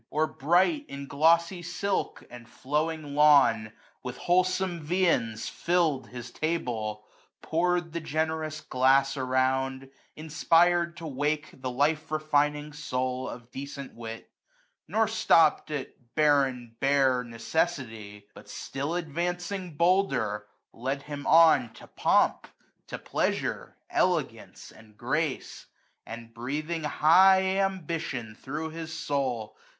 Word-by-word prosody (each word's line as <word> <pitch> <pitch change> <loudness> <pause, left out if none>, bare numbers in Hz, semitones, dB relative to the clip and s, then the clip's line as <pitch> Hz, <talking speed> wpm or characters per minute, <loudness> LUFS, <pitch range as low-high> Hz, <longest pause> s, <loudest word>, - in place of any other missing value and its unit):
i«$ - - -38
Or 155 +2 +1
bright 180 - +1
in 140 0 -7
glossy 170 +5 +2
silk, 190 +4 -3
and 120 -1 -12
flowing 150 +3 -2
lawn; 140 -8 +5 0.3
With 125 0 -6
wholesome 185 0 +1
viands 150 -10 0
fiU'd 160 -8 0
his 125 -1 -9
taUe; 115 -11 -3 0.4
pour'd 175 0 0
The 170 - -2
generous 155 0 -2
glass 135 +1 +2
around, 130 0 -1 0.2
inspired 170 +2 +2
to 165 - -8
wake 150 +1 -2
The 130 -1 -5
life 145 +5 0
refining 150 -1 0
soul 130 -3 -3
of 120 0 -10
decent 140 0 -7
wit: 115 -1 -9 0.6
Nor 220 +6 +2
flopped 165 -10 +3
at 145 -3 -4 0.2
barren 135 -6 +2
bare 135 -2 +3
necessity; 115 -2 -2
90 105 0 -16
But - - -14
flill 140 +5 -4
advancing 175 +1 -4
bolder, 125 - +1 0.3
led 135 +4 -3
him 145 -1 -7
on 160 -8 +5
To - - -13
pomp, - - +1 0.4
to - - -5
pleasure, - - -2
elegance, - - -1
and 110 -1 -18
grace; 140 +4 -3 0.4
And, 115 0 -9
breathing 150 +7 -4
high 190 +5 +5
ambition 165 - -2
thro' 150 +8 -6
his 160 0 -7
soul. 135 -8 -2
150 Hz, 115 wpm, -27 LUFS, 130-165 Hz, 0.6 s, lawn